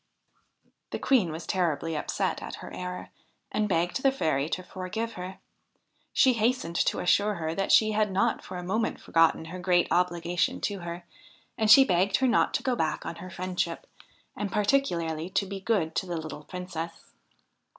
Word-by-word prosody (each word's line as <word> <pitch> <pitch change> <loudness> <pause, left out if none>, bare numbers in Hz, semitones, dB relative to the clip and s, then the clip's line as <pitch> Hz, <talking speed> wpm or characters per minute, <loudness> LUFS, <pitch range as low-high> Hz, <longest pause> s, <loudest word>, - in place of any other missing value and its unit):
The - - -3
Queen 225 -12 +2
was 160 +2 -6
terribly 165 -4 0
upset 150 - -1
at - - -6
her - - -10
error, 180 0 -6 0.4
and 210 0 0
begged 175 +6 0
the 270 - +4
Fairy 155 - 0
to 185 - -3
forgive 190 +6 -4
her. 180 +1 -7 0.7
She 260 - +5
hastened 230 -6 0
to - - +2
assure 205 +3 +2
her 160 -2 -3
that 195 +2 -1
she 215 -1 +6
had 210 -1 +1
not 190 +1 +1
for 185 - -7
a 180 - -5
moment 215 +5 -1
forgotten 165 -1 +2
her 180 +3 -7
great 180 -1 +3
obligation 175 -1 +1
to 200 -2 -2
her; 170 0 -7 0.5
and 220 -1 0
she 265 +5 +9
begged 190 0 +2
her 265 - +2
not 240 - +2
to - - -1
go 255 -2 +1
back 160 -7 -1
on 170 - -5
her 185 - -8
friendship, 180 -2 -3 0.5
and 205 -1 -3
particularly 175 - 0
to 195 +1 0
be 195 0 -6
good 190 -6 0
to 190 - -1
the 175 -1 -3
little 155 -1 -7
Princess. 170 -3 -7
180 Hz, 180 wpm, -28 LUFS, 170-210 Hz, 0.7 s, she